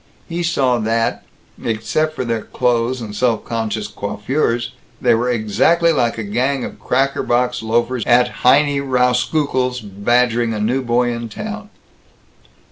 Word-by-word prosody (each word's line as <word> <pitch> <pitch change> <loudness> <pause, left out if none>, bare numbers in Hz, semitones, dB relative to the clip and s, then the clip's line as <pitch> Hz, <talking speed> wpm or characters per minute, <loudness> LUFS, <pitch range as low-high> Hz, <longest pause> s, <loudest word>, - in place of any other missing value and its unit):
He 170 0 -3
saw 135 -8 +1
that, 115 +1 0 0.4
except 155 +8 -1
for 130 - -3
their 115 -2 -1
clothes 120 +1 0
and 105 -2 -7
self 115 0 0
conscious 110 -2 -2
coiffures, 115 +4 -2 0.3
they 120 -1 +3
were 120 +2 +1
exactly 125 +10 +2
like 120 -6 0
a 115 - -3
gang 125 +6 -1
of - - -9
cracker 135 +2 0
box 125 +1 0
loafers 120 +2 0
at 125 +1 +5
Heinie 140 +2 +4
Rauskukle's 125 0 +1
badgering 115 +3 +1
a - - -3
new 120 +6 0
boy 120 0 +1
in 115 -1 -5
town. 215 - -6
120 Hz, 140 wpm, -18 LUFS, 115-130 Hz, 0.4 s, at